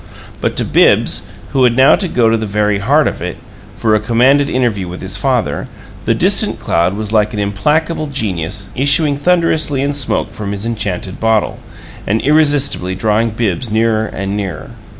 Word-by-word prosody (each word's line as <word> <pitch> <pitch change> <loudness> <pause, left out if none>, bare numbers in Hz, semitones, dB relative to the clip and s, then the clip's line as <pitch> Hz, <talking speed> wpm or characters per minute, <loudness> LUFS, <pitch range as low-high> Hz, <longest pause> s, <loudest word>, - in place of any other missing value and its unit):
But - - -1
to - - -1
Bibbs, - - +2 0.2
who 135 - +2
had 120 -1 +3
now 130 +1 +6
to 190 - -3
go 120 -8 +1
to 115 - +3
the 110 -1 -3
very 105 0 0
heart 100 - +2
of - - -4
it, - - -5 0.4
for 110 -1 +1
a 110 - +3
commanded 130 +6 +2
interview 115 -7 -1
with 90 +1 -7
his 95 +1 -3
father, 125 +2 -1 0.4
the - - +2
distant - - +2
cloud 85 +3 0
was 110 -1 -4
like 105 -1 +1
an - - -3
implacable 150 - 0
genius 100 - -3
issuing 145 +2 +3
thunderously 160 -3 +1
in 145 +1 -1
smoke 140 -3 -1
from 100 -1 -5
his 100 +2 -5
enchanted 100 -5 -4
bottle, 110 -1 0 0.5
and 110 +3 +1
irresistibly 145 - +2
drawing 110 +3 +1
Bibbs 110 +1 -2
nearer 110 0 +1
and 100 +1 -4
nearer. 100 -3 -5
110 Hz, 175 wpm, -15 LUFS, 100-135 Hz, 0.5 s, now